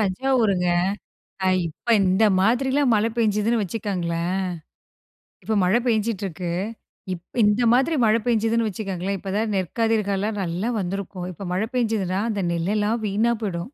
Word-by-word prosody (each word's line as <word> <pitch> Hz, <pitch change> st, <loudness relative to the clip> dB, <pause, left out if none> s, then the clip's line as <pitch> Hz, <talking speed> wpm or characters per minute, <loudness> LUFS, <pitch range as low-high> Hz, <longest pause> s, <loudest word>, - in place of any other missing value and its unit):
தஞ்சாவூருங்க. 205 Hz, -3 st, +1 dB, 0.8 s
அ -, -, +3 dB, 0.2 s
இப்ப 160 Hz, +8 st, -15 dB, 0.2 s
இந்த 190 Hz, +4 st, +3 dB
மாதிரிலாம் 260 Hz, +6 st, +2 dB
மழை 215 Hz, +2 st, +2 dB
பெஞ்சுதுன்னு 220 Hz, 0 st, +2 dB
வச்சுக்கங்களேன். 180 Hz, -4 st, -2 dB, 1.1 s
இப்ப 220 Hz, -, -1 dB
மழை 200 Hz, +6 st, +3 dB
பேஞ்சிட்டுருக்கு. 200 Hz, -6 st, -1 dB, 0.6 s
இப் 180 Hz, +6 st, -8 dB
இந்த 210 Hz, +3 st, +3 dB
மாதிரி 265 Hz, +7 st, +3 dB
மழை 220 Hz, +1 st, +4 dB
பேஞ்சுதுன்னு 225 Hz, -1 st, +2 dB
வச்சுக்கோங்களேன், 195 Hz, -1 st, -3 dB
இப்பதான் 205 Hz, +3 st, -2 dB
நெற்கதிர்காலம் 210 Hz, +1 st, 0 dB
நல்லா 180 Hz, +5 st, -2 dB
வந்திருக்கும் 185 Hz, -1 st, -4 dB
இப்ப 190 Hz, +3 st, -8 dB
மழை 190 Hz, +4 st, 0 dB
பெஞ்சுதுனா 215 Hz, -6 st, 0 dB
அந்த 205 Hz, -3 st, -2 dB
நெல்லெல்லாம் 210 Hz, +6 st, 0 dB
வீணா 215 Hz, +4 st, +1 dB
போய்டும். 185 Hz, -5 st, -2 dB
205 Hz, 120 wpm, -23 LUFS, 185-225 Hz, 1.1 s, மழை